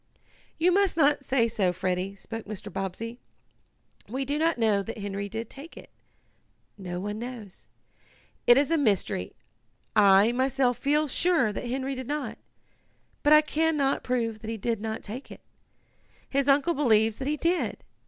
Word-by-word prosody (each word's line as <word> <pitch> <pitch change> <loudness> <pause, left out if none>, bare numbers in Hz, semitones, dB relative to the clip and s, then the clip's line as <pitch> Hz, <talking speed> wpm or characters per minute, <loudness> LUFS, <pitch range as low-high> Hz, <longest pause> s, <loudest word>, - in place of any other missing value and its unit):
"You 345 +3 +3
must 390 -2 +2
not 290 -2 +3
say 255 -3 +2
so, 200 -5 +1
Freddie," 185 +2 -2
spoke 225 +2 -8
Mr. 205 -2 -7
Bobbsey. 195 +5 -5 0.9
"We 265 +4 -2
do 290 +3 -1
not 325 -1 +2
know 215 -4 +2
that 225 +3 -7
Henry 200 -1 -4
did 225 +2 -5
take 285 +8 -11
it. - - -12 0.8
No 180 -3 -6
one 205 +3 -4
knows. 235 -5 -9 0.8
It 240 - +8
is 285 +3 +2
a 330 - +3
mystery. 200 - 0 0.6
I, 200 +1 +6
myself 260 0 +1
feel 300 +2 +2
sure 290 -6 +2
that 240 - -5
Henry 265 +2 -2
did 260 -2 -6
not, 295 0 -4 0.8
but 295 - +2
I 305 0 +9
can 315 +1 0
not 275 -1 +1
prove 230 -3 -1
that 220 - -8
he 225 - -3
did 225 0 -2
not 220 0 -4
take 240 +6 -8
it. - - -11 0.9
His 275 0 0
uncle 285 +4 +4
believes 225 -7 +2
that 265 - -3
he 300 +1 0
did. 345 +4 -1
240 Hz, 165 wpm, -27 LUFS, 210-285 Hz, 0.9 s, I